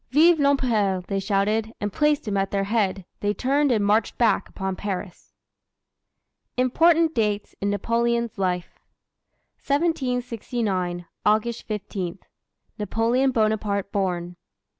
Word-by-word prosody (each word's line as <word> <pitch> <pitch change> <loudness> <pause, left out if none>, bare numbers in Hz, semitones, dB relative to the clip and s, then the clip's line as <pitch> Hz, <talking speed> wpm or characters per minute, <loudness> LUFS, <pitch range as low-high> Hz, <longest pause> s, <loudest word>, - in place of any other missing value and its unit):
"Vive 320 +5 +5
l'Empereur!" 230 -10 +2
they 195 - -1
shouted; 210 +3 0
and 205 -1 -3
placing 295 -8 +1
him - - 0
at 195 0 0
their 195 -1 0
head, 195 -3 0
they 205 0 0
turned 280 +2 +2
and 215 -4 +2
marched 210 +2 +2
back 225 -4 +2
upon 190 -1 -4
Paris. 190 -2 -6 1.3
IMPORTANT 325 +6 +4
DATES 210 -3 -1
IN 200 - 0
NAPOLEON'S 235 +2 0
LIFE 180 -2 -2 0.8
1769. 245 - -1 0.2
August 220 +2 +1
15. 195 -4 -4 0.6
Napoleon 230 +5 +1
Bonaparte 215 -4 0
born. 180 -3 -2
215 Hz, 115 wpm, -24 LUFS, 195-250 Hz, 1.3 s, Vive